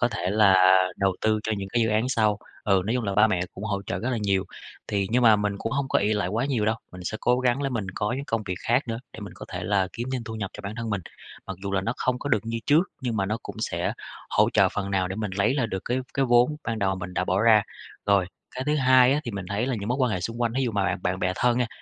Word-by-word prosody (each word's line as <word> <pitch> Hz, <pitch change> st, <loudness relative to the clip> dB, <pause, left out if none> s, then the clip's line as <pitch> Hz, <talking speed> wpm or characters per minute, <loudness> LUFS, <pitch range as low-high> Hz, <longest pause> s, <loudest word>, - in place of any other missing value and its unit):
có 120 Hz, -, +3 dB
thể 95 Hz, -6 st, -2 dB
là 100 Hz, -3 st, +5 dB, 0.4 s
đầu 95 Hz, -2 st, +1 dB
tư 110 Hz, 0 st, +2 dB
cho 110 Hz, -, -1 dB
những 95 Hz, -1 st, -5 dB
cái 120 Hz, +3 st, +1 dB
dự 110 Hz, -, +1 dB
án 110 Hz, +3 st, +1 dB
sau. 110 Hz, -4 st, +2 dB, 0.3 s
Ừ, 95 Hz, -2 st, +3 dB
nói 115 Hz, -, 0 dB
chung 125 Hz, -3 st, -1 dB
là 100 Hz, -, -2 dB
ba 105 Hz, +2 st, +6 dB
mẹ 95 Hz, -5 st, 0 dB
cũng 100 Hz, -, -7 dB
hỗ 100 Hz, -2 st, -2 dB
trợ -, -, -2 dB
rất 125 Hz, +3 st, -2 dB
là 120 Hz, -, -1 dB
nhiều. 95 Hz, -1 st, +1 dB, 0.4 s
Thì 100 Hz, -1 st, 0 dB
nhưng 125 Hz, +1 st, +2 dB
mà 110 Hz, -2 st, +7 dB
mình 105 Hz, -1 st, -1 dB
cũng 115 Hz, -, -3 dB
hông 140 Hz, 0 st, -1 dB
có -, -, +3 dB
ỷ 105 Hz, +2 st, +1 dB
lại 105 Hz, -4 st, 0 dB
quá 115 Hz, +6 st, -1 dB
nhiều 130 Hz, -6 st, 0 dB
đâu, 110 Hz, +1 st, +1 dB, 0.2 s
mình 90 Hz, -1 st, -9 dB
sẽ 110 Hz, -, -3 dB
cố 125 Hz, +1 st, +2 dB
gắng 130 Hz, +2 st, +1 dB
là 135 Hz, -, 0 dB
mình 115 Hz, -6 st, -3 dB
có 105 Hz, +2 st, -1 dB
những 140 Hz, -, -4 dB
công 115 Hz, -4 st, -1 dB
việc 90 Hz, -, -2 dB
khác 125 Hz, +2 st, +2 dB
nữa, 115 Hz, 0 st, -2 dB
để -, -, -10 dB
mình 100 Hz, -4 st, -8 dB
có -, -, -10 dB
thể 90 Hz, +1 st, -4 dB
là 95 Hz, -1 st, +1 dB
kiếm 120 Hz, +2 st, -5 dB
thêm 125 Hz, -3 st, -3 dB
thu 110 Hz, -, -6 dB
nhập 100 Hz, -3 st, -4 dB
cho -, -, -8 dB
bản 100 Hz, +2 st, -5 dB
thân 115 Hz, -1 st, -4 dB
mình. 100 Hz, -, -1 dB, 0.5 s
Mặc 95 Hz, -2 st, -5 dB
dù 100 Hz, 0 st, -3 dB
là 95 Hz, -, +2 dB
nó 115 Hz, +5 st, -1 dB
không 125 Hz, -1 st, 0 dB
có 145 Hz, -, -4 dB
được 115 Hz, -, +3 dB
như 115 Hz, 0 st, -2 dB
trước, 150 Hz, +4 st, +5 dB, 0.2 s
nhưng 120 Hz, -4 st, -2 dB
mà 95 Hz, -, 0 dB
nó 105 Hz, +3 st, -1 dB
cũng -, -, -8 dB
sẽ -, -, -1 dB, 0.4 s
hỗ -, -, +3 dB
trợ -, -, +5 dB
phần 100 Hz, -1 st, -4 dB
nào 95 Hz, -2 st, +1 dB
để 95 Hz, -, -5 dB
mình 105 Hz, -3 st, -3 dB
lấy 100 Hz, +7 st, +2 dB
lại 125 Hz, -5 st, +1 dB
được 95 Hz, -3 st, -5 dB
cái 125 Hz, +2 st, 0 dB, 0.2 s
cái 135 Hz, -, +2 dB
vốn 125 Hz, +4 st, +4 dB
ban 115 Hz, -2 st, -2 dB
đầu 95 Hz, -1 st, 0 dB
mình 90 Hz, 0 st, -7 dB
đã 90 Hz, -, 0 dB
bỏ 95 Hz, +3 st, +1 dB
ra. 110 Hz, -2 st, +6 dB, 0.4 s
Rồi, 100 Hz, -3 st, +3 dB, 0.2 s
cái 130 Hz, -, -5 dB
thứ 150 Hz, +2 st, +1 dB
hai 130 Hz, -1 st, +5 dB
á, 150 Hz, -, +1 dB
thì 120 Hz, -, -3 dB
mình 100 Hz, -3 st, -5 dB
thấy 105 Hz, +5 st, -1 dB
là 130 Hz, -, 0 dB
những 100 Hz, -, -4 dB
mối 125 Hz, -, +1 dB
quan 125 Hz, -3 st, +3 dB
hệ 90 Hz, -, -1 dB
xung 115 Hz, +6 st, -4 dB
quanh, 115 Hz, -1 st, +1 dB
thí 135 Hz, -, +1 dB
dụ 120 Hz, -, 0 dB
mà 100 Hz, -1 st, 0 dB
bạn -, -, 0 dB
bạn 90 Hz, +1 st, -1 dB
bè 90 Hz, -, 0 dB
thân 120 Hz, 0 st, +2 dB
nha, 125 Hz, -, +1 dB
110 Hz, 315 wpm, -25 LUFS, 100-120 Hz, 0.5 s, mà